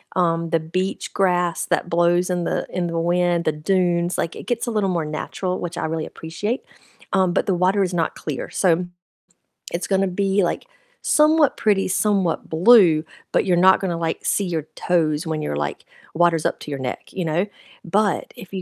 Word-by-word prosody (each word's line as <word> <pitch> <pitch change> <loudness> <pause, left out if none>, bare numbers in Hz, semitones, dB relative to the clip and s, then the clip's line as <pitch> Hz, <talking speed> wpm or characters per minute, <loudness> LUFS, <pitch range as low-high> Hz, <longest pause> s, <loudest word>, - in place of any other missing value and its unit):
um, 165 -2 +1
the 165 - +3
beach 185 +5 -3
grass 180 -3 +1
that 175 - 0
blows 175 +1 +2
in 175 -1 -1
the - - -1
in 180 -1 -1
the 170 0 -2
wind, 175 0 +1
the 155 - +3
dunes, 175 +2 0
like, 165 - -2
it - - -10
gets 240 -2 -1
a 235 - -1
little 205 -3 0
more 170 -3 -1
natural, 180 +4 -3
which 175 0 -5
I - - -2
really 160 0 -2
appreciate, 205 +10 -4 0.5
um, 190 -2 +3
but - - +1
the 195 - +2
water 185 +3 +2
is 185 -1 -2
not 165 -2 -1
clear, 150 -4 -5
so 180 -2 +2 0.9
it's 175 +1 -2
gonna 195 0 +2
be, 195 +1 +1
like, 175 - -2 0.4
somewhat 305 -1 +4
pretty, 205 -3 +2
somewhat 195 -3 +1
blue, 170 -2 +6 0.3
but - - +3
you're 180 -2 +2
not 190 +2 +6
gonna 175 -3 -1
like 165 -1 -2
see 200 - +1
your 165 -4 -2
toes 160 -2 0
when 160 -1 -2
you're 75 - -3
like 75 0 -4 0.3
water's 170 -1 +2
up - - 0
to - - -8
your 140 - -4
neck, 130 -1 -5
you 180 - -3
know, 165 +5 +1 0.4
but 200 +2 0
if 190 - -12
you 190 - -3
175 Hz, 195 wpm, -22 LUFS, 165-190 Hz, 0.9 s, blue